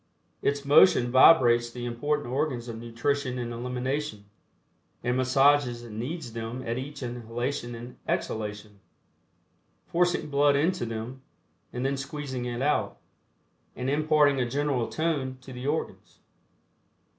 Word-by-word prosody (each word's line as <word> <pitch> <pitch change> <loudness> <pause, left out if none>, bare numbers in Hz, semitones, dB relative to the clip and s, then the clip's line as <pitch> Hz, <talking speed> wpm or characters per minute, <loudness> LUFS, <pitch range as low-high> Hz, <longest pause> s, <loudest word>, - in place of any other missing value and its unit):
Its 140 0 0
motion 140 -4 +6
vibrates 120 -3 +6
the 120 0 -6
important 145 +4 -1
organs 130 -2 -2
of 115 -1 -6
nutrition 125 +3 -2
and 120 -1 -4
elimination, 125 -1 -3 0.8
and 125 0 0
massages 130 -1 +3
and 110 -2 -8
kneads 135 -1 -5
them 115 +2 -5
at 115 +2 -2
each 140 +1 -7
inhalation 120 +1 -4
and 120 +2 -10
exhalation, 105 -1 -3 1.1
forcing 175 -1 +1
blood 145 0 +4
into 155 -2 +1
them, 115 +4 -6 0.5
and 125 +1 -3
then 140 +1 +1
squeezing 140 -2 -5
it 120 +1 -3
out, 150 +1 0 0.8
and 130 +2 -2
imparting 150 -2 +3
a 120 - -1
general 140 -3 0
tone 145 -5 -1
to 130 0 -11
the 125 +2 -5
organs. 155 +2 -3
130 Hz, 130 wpm, -27 LUFS, 120-145 Hz, 1.1 s, motion